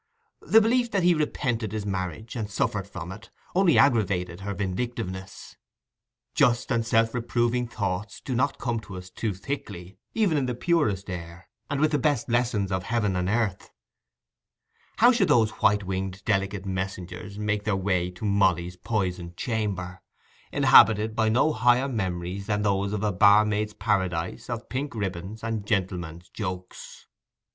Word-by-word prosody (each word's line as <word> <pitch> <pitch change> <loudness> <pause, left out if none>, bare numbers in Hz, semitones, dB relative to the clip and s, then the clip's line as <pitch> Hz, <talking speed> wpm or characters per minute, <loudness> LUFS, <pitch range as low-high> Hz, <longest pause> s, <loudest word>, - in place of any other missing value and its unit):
The 225 - +5
belief 240 +2 +2
that 195 -5 0
he 175 0 +5
repented 125 - -1
his 105 -2 -3
marriage, 95 +3 -4
and 110 -3 -3
suffered 100 -1 -1
from 90 -2 -7
it, 100 +3 -11 0.2
only 180 -3 +4
aggravated 100 -9 +2
her 100 0 -4
vindictiveness. 95 -1 -5 0.8
Just 120 +1 +2
and 115 -2 +2
self 115 0 +2
reproving 120 0 0
thoughts 105 -3 -3
do 130 - -5
not 135 +3 +1
come 120 -3 -2
to 100 -3 -10
us 90 0 -10
too 110 - -2
thickly, 95 -5 -6 0.2
even 195 -9 +2
in 130 - -1
the 125 - -2
purest 115 - +1
air, 85 -1 -7 0.2
and 145 -1 -1
with 155 +1 +3
the 150 - +2
best 130 -3 0
lessons 115 -4 +1
of 95 -1 0
heaven 110 -5 0
and 90 0 0
earth; 105 -4 -1 1.3
how 240 +4 +7
should 230 -6 +2
those 110 -2 +4
white 105 -1 +4
winged 95 0 -4
delicate 100 -2 0
messengers 95 0 -5
make 105 -1 -1
their 105 -2 0
way 95 -2 0
to 90 +4 -8
Molly's 90 -3 +1
poisoned 90 -6 -3
chamber, 95 -6 -3 0.5
inhabited 110 0 +6
by 110 -1 +2
no 130 +8 +3
higher 120 +4 +3
memories 95 -4 -3
than 105 -1 0
those 100 -1 +1
of 105 0 -2
a 105 - +2
barmaid's 105 +2 +4
paradise 95 -5 -1
of 120 -1 -4
pink 140 +1 -4
ribbons 95 +1 -4
and 110 -3 -3
gentlemen's 90 -4 -2
jokes? 90 -3 -7
105 Hz, 155 wpm, -26 LUFS, 95-120 Hz, 1.3 s, how